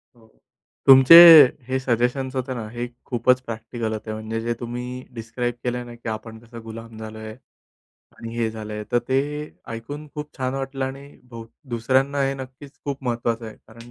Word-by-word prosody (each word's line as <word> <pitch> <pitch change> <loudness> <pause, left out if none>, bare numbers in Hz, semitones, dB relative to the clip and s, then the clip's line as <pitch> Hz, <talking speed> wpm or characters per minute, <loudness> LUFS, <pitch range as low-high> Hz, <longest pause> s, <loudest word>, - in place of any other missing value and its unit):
हो, 115 -2 -22 0.6
तुमचे 135 +4 +9 0.5
हे 130 0 -1
सजेशन्स 130 +2 -1
होते 130 0 -3
ना, 115 -3 -6
हे 120 +1 -5 0.2
खूपच 125 +1 +2
प्रॅक्टिकल 115 -1 -5
होते. 110 0 -6
म्हणजे 110 +1 -5
जे 120 +1 -1
तुम्ही 125 +1 -6
डिस्क्राईब 120 +1 -4
केलंय 125 0 -2
ना 120 0 -11
की, 115 -1 -7
"आपण 110 +1 -7
कसं 115 0 -12
गुलाम 115 0 -10
झालोय? 110 0 -8 0.8
आणि 115 0 -8
हे 115 -1 0
झालंय," 105 -1 -7
तर 120 - +4
ते 130 +1 +2 0.5
ऐकून 145 +7 -7
खूप 150 0 -8
छान 130 0 -2
वाटलं 135 0 -3
आणि 135 +1 -7 0.3
हो 115 -1 -8 0.3
दुसऱ्यांना 130 +4 +1
हे 135 - -2
नक्कीच 135 +2 -10
खूप 140 -1 -5
महत्त्वाचं 115 -1 -2
आहे. 110 - -10
कारण 115 +1 -14
120 Hz, 170 wpm, -23 LUFS, 115-130 Hz, 0.8 s, तुमचे